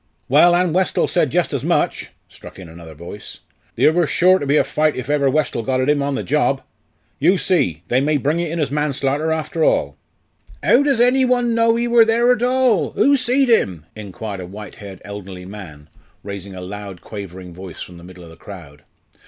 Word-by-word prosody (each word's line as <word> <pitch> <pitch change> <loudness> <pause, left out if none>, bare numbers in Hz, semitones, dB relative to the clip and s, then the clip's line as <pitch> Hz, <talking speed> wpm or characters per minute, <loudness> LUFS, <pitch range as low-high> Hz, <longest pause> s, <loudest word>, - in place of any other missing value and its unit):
"Well, 170 +6 +5
an' 175 -2 +1
Westall 185 +1 +1
said - - +1
jus' - - 0
as - - -2
much!" - - 0 0.2
struck - - -14
in 95 -2 -10
another 80 -1 -12
voice; 85 +6 -10 0.3
"theer 155 - +4
wor 175 -1 +2
sure 185 +4 +3
to 145 - -4
be 145 +2 +3
a - - +4
fight 155 0 0
iv 130 +3 -4
ever 140 -2 +2
Westall 150 -4 0
got 130 +2 -1
at 130 - 0
'im 150 -1 +2
on 140 0 -1
the 105 - -3
job. 90 - 0 0.6
You 190 - +3
see 90 - 0
they 125 +2 +2
may 150 +1 +1
bring 150 +4 -1
it 170 -1 -2
in 165 - -4
manslarter 145 0 -1
after 160 +1 -2
all." - - +1 0.7
"'Ow 250 - +4
does 280 -4 +1
any 250 +2 +4
one 245 -2 +1
know 230 0 +3
ee 240 +1 -1
wor 235 -1 +6
there 235 +2 +3
at 245 -2 +1
all? 250 -3 +1
who 280 +1 +3
seed 260 +1 +1
him?" 90 - +1
inquired 105 -1 -7
a 90 - -8
white 105 +3 -10
haired 100 -4 -11
elderly 95 -3 -8
man, 90 -7 -11 0.4
raising 100 -1 -8
a 90 - -7
loud 100 -1 -8
quavering 95 -4 -9
voice 90 -1 -9
from 90 - -12
the - - -14
middle 90 0 -13
of 85 - -13
the - - -14
crowd. 80 -7 -12
140 Hz, 210 wpm, -19 LUFS, -, 0.7 s, wor